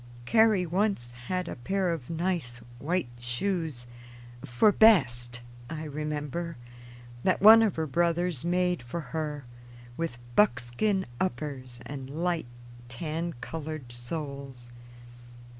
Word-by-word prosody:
Carrie 220 Hz, -, +4 dB
once 180 Hz, -, 0 dB
had 165 Hz, +10 st, -4 dB
a -, -, -4 dB
pair 185 Hz, +8 st, 0 dB
of 140 Hz, -7 st, -7 dB
nice 165 Hz, -7 st, -1 dB, 0.2 s
white 165 Hz, -3 st, -1 dB
shoes 140 Hz, +1 st, -2 dB, 0.6 s
"for 120 Hz, -, +4 dB
best," 125 Hz, -, +5 dB, 0.3 s
I 160 Hz, -1 st, -5 dB
remember, 150 Hz, +2 st, -4 dB, 0.7 s
that 185 Hz, -, +3 dB
one 220 Hz, +3 st, +10 dB
of 220 Hz, -3 st, +2 dB
her 160 Hz, -, -1 dB
brothers 170 Hz, 0 st, +1 dB
made 180 Hz, -2 st, +1 dB
for 120 Hz, +8 st, -5 dB
her, 150 Hz, -3 st, -3 dB, 0.5 s
with 165 Hz, -7 st, -3 dB, 0.2 s
buckskin 190 Hz, -, +2 dB
uppers 135 Hz, -9 st, -3 dB
and 135 Hz, 0 st, -7 dB
light 165 Hz, 0 st, -1 dB, 0.4 s
tan 160 Hz, +6 st, -3 dB
colored 155 Hz, -2 st, -6 dB
soles. 135 Hz, -1 st, -5 dB
155 Hz, 110 wpm, -28 LUFS, 125-180 Hz, 0.7 s, one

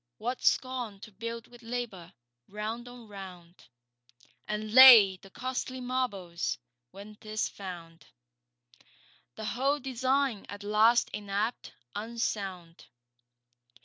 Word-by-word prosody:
What 245 Hz, +3 st, -3 dB
scorn 250 Hz, -6 st, 0 dB
to 220 Hz, -, -11 dB
build 230 Hz, +3 st, -6 dB
with 240 Hz, 0 st, -16 dB
labour, 230 Hz, -7 st, -5 dB, 0.4 s
round 215 Hz, +4 st, -5 dB
on 245 Hz, -2 st, -12 dB
round, 185 Hz, -4 st, -11 dB, 0.8 s
And 210 Hz, 0 st, -4 dB
lay 230 Hz, -7 st, +10 dB
the 195 Hz, -, -16 dB
costly 255 Hz, +3 st, -4 dB
marbles, 200 Hz, -, -2 dB, 0.3 s
when 205 Hz, +7 st, -12 dB
'tis 215 Hz, 0 st, -2 dB
found 170 Hz, -4 st, -10 dB, 1.3 s
The 220 Hz, -, -6 dB
whole 275 Hz, +6 st, 0 dB
design 260 Hz, -2 st, 0 dB
at 205 Hz, 0 st, -8 dB
last 215 Hz, +3 st, +4 dB
inapt, 210 Hz, +3 st, -3 dB, 0.2 s
unsound! 200 Hz, -6 st, -4 dB
215 Hz, 105 wpm, -29 LUFS, 195-245 Hz, 1.3 s, lay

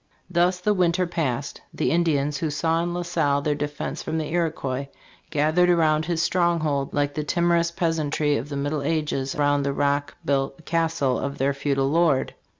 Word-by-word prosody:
Thus 180 Hz, +1 st, +2 dB
the 210 Hz, +3 st, +2 dB
winter 180 Hz, -1 st, +2 dB
passed. 145 Hz, -6 st, -3 dB
The -, -, -1 dB
Indians, 150 Hz, -4 st, +1 dB
who 160 Hz, +1 st, -1 dB
saw 160 Hz, +3 st, 0 dB
in 175 Hz, 0 st, -2 dB
La 175 Hz, 0 st, -2 dB
Salle 150 Hz, -5 st, 0 dB
their 150 Hz, -, +1 dB
defense 145 Hz, 0 st, -4 dB
from 160 Hz, -, -3 dB
the 155 Hz, -1 st, -3 dB
Iroquois, 140 Hz, -6 st, -1 dB, 0.4 s
"gathered 155 Hz, +4 st, +2 dB
around 155 Hz, -3 st, +3 dB
his 170 Hz, -1 st, 0 dB
stronghold 160 Hz, -6 st, +1 dB
like 145 Hz, 0 st, 0 dB
the 150 Hz, -, -2 dB
timerous 170 Hz, +2 st, +2 dB
peas 170 Hz, -2 st, -1 dB
antry 145 Hz, -1 st, 0 dB
of 135 Hz, +6 st, -7 dB
the 140 Hz, -, -4 dB
middle 145 Hz, +1 st, -1 dB
ages 145 Hz, -3 st, -1 dB
round 145 Hz, -1 st, +2 dB
the 140 Hz, 0 st, -1 dB
rock 145 Hz, 0 st, 0 dB
built 135 Hz, +1 st, -1 dB
castle 165 Hz, -5 st, 0 dB
of 140 Hz, +1 st, -4 dB
their 140 Hz, +1 st, +1 dB
feudal 140 Hz, -1 st, 0 dB
lord. 160 Hz, -4 st, +2 dB
155 Hz, 180 wpm, -24 LUFS, 140-170 Hz, 0.4 s, around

